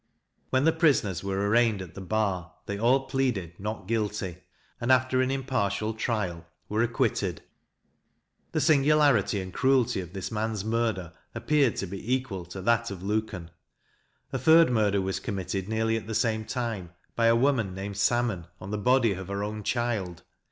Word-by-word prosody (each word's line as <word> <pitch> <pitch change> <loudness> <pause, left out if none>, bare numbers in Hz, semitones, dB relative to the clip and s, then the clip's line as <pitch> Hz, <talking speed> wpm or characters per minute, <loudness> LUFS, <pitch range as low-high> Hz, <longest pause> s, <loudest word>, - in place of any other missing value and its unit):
When 130 +1 +2
the 160 +1 +4
prisoners 135 - +2
were 100 +1 -1
arraigned 115 -1 +3
at 90 -4 -8
the 95 - -8
bar, 95 -3 -1
they 100 - -3
all 125 +4 +4
pleaded 130 - -1
"Not 105 -1 -5
guilty;" 105 -5 -2 0.4
and, 120 +2 +1
after 130 0 +3
an 130 - +1
impartial 115 -6 -1
trial, 105 -7 -2 0.2
were 110 +2 0
acquitted. 115 - 0 1.1
The - - 0
singularity 145 - +4
and 95 -1 -6
cruelty 130 -5 +2
of 90 0 -10
this 95 +1 -5
man's 110 -2 -2
murder 110 -7 -1 0.2
appeared 145 -6 +2
to - - -2
be 100 +7 -1
equal 115 -9 -5
to 90 +2 -8
that 115 +2 +2
of 95 -2 -7
Luken. 105 -5 -2 0.8
A - - -1
third 160 -3 +6
murder 105 -4 +2
was 95 0 -2
committed, 95 -1 -4
nearly 110 0 +1
at 110 - -7
the 110 - -3
same 110 -1 +1
time, 110 -9 -4 0.2
by 115 -1 +3
a 115 - +5
woman 115 -7 +1
named 100 +1 -5
Salmon, 110 -6 +1
on 95 - -8
the 105 - -2
body 125 -1 +3
of 95 -1 -7
her 100 +1 -3
own 105 +1 -4
child. 105 -7 -2
110 Hz, 170 wpm, -27 LUFS, 95-120 Hz, 1.1 s, third